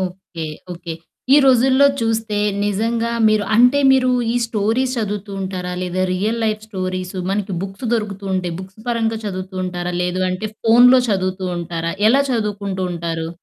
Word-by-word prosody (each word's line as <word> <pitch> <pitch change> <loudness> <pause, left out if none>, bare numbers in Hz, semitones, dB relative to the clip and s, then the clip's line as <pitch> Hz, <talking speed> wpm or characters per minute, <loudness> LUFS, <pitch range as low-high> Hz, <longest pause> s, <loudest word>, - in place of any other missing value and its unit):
Okay. 180 -3 -5 0.3
Okay. 170 -1 -7 0.4
ఈ - - +8
రోజుల్లో 265 +2 +5
చూస్తే 225 -2 -1 0.3
నిజంగా 230 +3 0 0.2
మీరు 215 -1 +2
అంటే 250 +4 +5
మీరు 255 -1 +4 0.2
ఈ - - -3
స్టోరీస్ 230 +4 0
చదువుతూ 205 -1 -3
ఉంటారా? 185 -1 -4
లేదా 185 +1 -1
రియల్ 215 +5 -1
లైఫ్ 215 0 -1
స్టోరీస్ 185 -2 -4 0.2
మనకి 200 -1 -2
బుక్స్ 195 +5 -7
దొరుకుతూ 205 -3 -2
ఉంటాయి. 180 -2 -2
బుక్స్ 190 +2 -12
పరంగా 225 -2 0
చదువుతూ 185 -1 -5
ఉంటారా! 180 -1 -3
లేదు 180 +1 -1
అంటే 185 +4 -3
ఫోనులో 245 +3 +7
చదువుతూ 185 -2 -1
ఉంటారా? 170 -1 -3 0.2
ఎలా 270 +5 +4
చదువుకుంటూ 205 -5 -2
ఉంటారు? 165 -1 -3
200 Hz, 150 wpm, -19 LUFS, 185-225 Hz, 0.4 s, ఈ